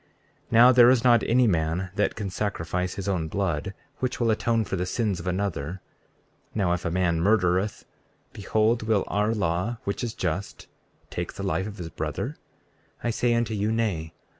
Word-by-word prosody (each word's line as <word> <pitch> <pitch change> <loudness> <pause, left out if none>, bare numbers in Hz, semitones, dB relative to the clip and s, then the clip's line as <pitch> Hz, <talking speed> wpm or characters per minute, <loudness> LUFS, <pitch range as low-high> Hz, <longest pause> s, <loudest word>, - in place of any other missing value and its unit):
34:11 - - -37 0.4
Now 120 +2 +8
there 120 -1 +7
is 125 -2 +3
not 120 -2 +5
any 125 +2 +4
man 90 -1 0
that 105 +1 0
can 105 -3 -4
sacrifice 90 -2 -2
his 100 -1 -5
own 90 -5 0
blood 95 0 -2 0.2
which 130 0 -2
will 115 -2 +2
atone 115 0 +1
for 95 - -3
the 90 0 -2
sins 105 -3 -1
of 85 - -7
another. 90 -3 -2 0.8
Now, 95 -5 +2
if 90 - -3
a - - +1
man 85 -1 +1
murdereth, 95 0 +1 0.5
behold 110 +3 +1
will 110 -3 +1
our 105 +2 0
law, 95 +4 -1
which 100 - -3
is 115 -2 -3
just, 95 +3 -3 0.5
take 85 0 -4
the 100 - -6
life 95 0 -1
of 105 -1 -8
his 85 -3 -6
brother? - - -4 0.7
I 120 - +1
say 120 +1 +1
unto 115 -1 0
you, 105 +1 0
Nay. 100 -9 -1
100 Hz, 185 wpm, -26 LUFS, 90-115 Hz, 0.8 s, Now